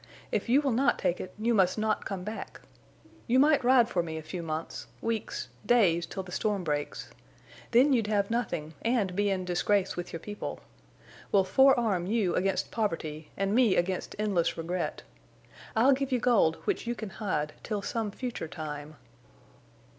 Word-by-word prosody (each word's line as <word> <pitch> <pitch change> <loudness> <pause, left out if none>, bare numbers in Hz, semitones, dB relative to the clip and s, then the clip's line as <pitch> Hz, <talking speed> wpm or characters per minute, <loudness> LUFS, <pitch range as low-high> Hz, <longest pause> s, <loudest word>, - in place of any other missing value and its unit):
If - - -1
you 270 +4 +5
will 275 - +1
not 265 +4 +2
take 175 - 0
it 185 - -7
you 230 +3 +1
must 190 -3 +3
not 215 0 0
come 190 -2 -4
back. 215 +3 -7 0.7
You 250 +1 +3
might 290 0 +5
ride 245 -1 +5
for 180 - 0
me 160 -1 -5
a 160 - -6
few 170 +3 -5
months—weeks—days 170 +2 -1
till 190 - -5
the 180 - -11
storm 205 0 -1
breaks. 145 -2 -3 0.6
Then 260 +4 +5
you'd 230 -4 +2
have 205 0 +1
nothing, 165 -10 -2
and 225 -6 0
be 205 +1 +2
in 185 -2 -1
disgrace 190 +2 +1
with 175 0 -5
your 165 - -5
people. 205 +4 -6 0.7
We'll 195 -2 +5
forearm 220 -4 +3
you 205 -4 +1
against 190 +1 0
poverty, 160 -8 -3
and 195 +1 0
me 235 -4 +4
against 185 +1 -1
endless 200 -5 0
regret. 170 +3 -3 0.7
I'll 250 +5 +5
give 270 0 -2
you 255 - +3
gold 220 -10 +3
which 395 - -1
you 240 - -1
can 220 -4 -6
hide—till 200 +2 -3
some 225 0 -2
future 240 -5 -5
time." 155 -1 -7
200 Hz, 165 wpm, -29 LUFS, 175-235 Hz, 0.7 s, you